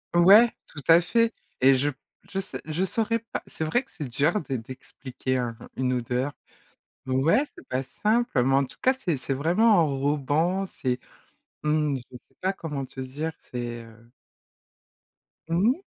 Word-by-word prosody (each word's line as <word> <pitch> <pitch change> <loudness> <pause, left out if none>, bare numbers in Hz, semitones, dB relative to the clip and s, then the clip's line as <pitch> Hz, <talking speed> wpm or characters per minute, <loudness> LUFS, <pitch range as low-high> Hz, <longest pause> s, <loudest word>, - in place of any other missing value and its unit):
Ouais, 200 +7 +8 0.2
tout 150 - -10
à 165 +1 +8
fait 230 +5 +2 0.3
et 135 +1 +7
je 140 +3 +1
p 140 - -8 0.3
je 195 - -2
sais 195 - -6
je 160 +4 -1
saurais 230 +3 0
pas, 230 +1 -6
c'est - - -5
vrai 245 +11 +1
que 270 - -26
c'est 150 -5 -6
dur 150 - +1
d'e 135 -3 -4
d'expliquer 130 +2 -5
un 120 -2 -3 0.2
une 130 -1 0
odeur. 125 +3 -1 0.7
Ouais, 140 - +3
c'est - - -14
pas 130 +1 -1
simple, 215 - +1
mais 135 +2 +2
en 135 0 +3
tout - - -14
cas, 260 - +4
c'est 190 - -2
c'est 135 +1 -2
vraiment 180 +10 +4
enrobant. 150 +5 +1
C'est, 130 -8 -2 0.6
mmh, 150 -2 +1
je 125 - -10
sais - - -19
pas 190 +1 +1
comment 150 -7 -5
te 130 - -9
dire, 145 +5 -4
c'est, 120 -1 -5
heu 115 +1 -17 1.4
Mmh. 205 - +2
150 Hz, 170 wpm, -26 LUFS, 130-190 Hz, 1.4 s, Ouais